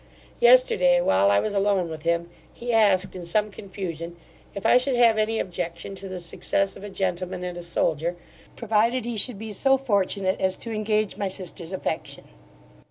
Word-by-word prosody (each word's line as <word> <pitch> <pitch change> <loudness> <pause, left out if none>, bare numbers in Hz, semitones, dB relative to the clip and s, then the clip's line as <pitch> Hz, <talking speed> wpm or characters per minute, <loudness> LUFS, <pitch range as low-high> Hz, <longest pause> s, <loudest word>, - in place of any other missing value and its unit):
Yesterday, 485 - +5
while 100 - +3
I 100 0 +4
was 215 - -2
alone 200 -3 +1
with 160 -1 -7
him 170 +1 -1 0.2
he 240 0 -4
asked, 200 -5 +3
in 180 - -6
some 210 +5 0
confusion, 175 -4 -6 0.4
if 200 - -6
I 250 - +6
should 255 0 -1
have 230 -2 +4
any 220 +1 +1
objection 175 0 -4
to 195 0 -8
the 185 -1 -5
success 195 +3 -1
of - - -11
a 205 - -6
gentleman 185 -1 -3
and 180 -1 -4
a 175 - -6
soldier, 170 0 -1 0.4
provided 230 +2 +1
he 240 -1 -3
should 220 +1 -1
be 220 +1 -7
so 270 +6 +3
fortunate 200 -6 0
as 190 0 +1
to 230 - -6
engage 215 -1 -1
my 200 - -1
sister's 185 -2 -6
affection. 190 - -4
195 Hz, 180 wpm, -25 LUFS, 175-220 Hz, 0.4 s, I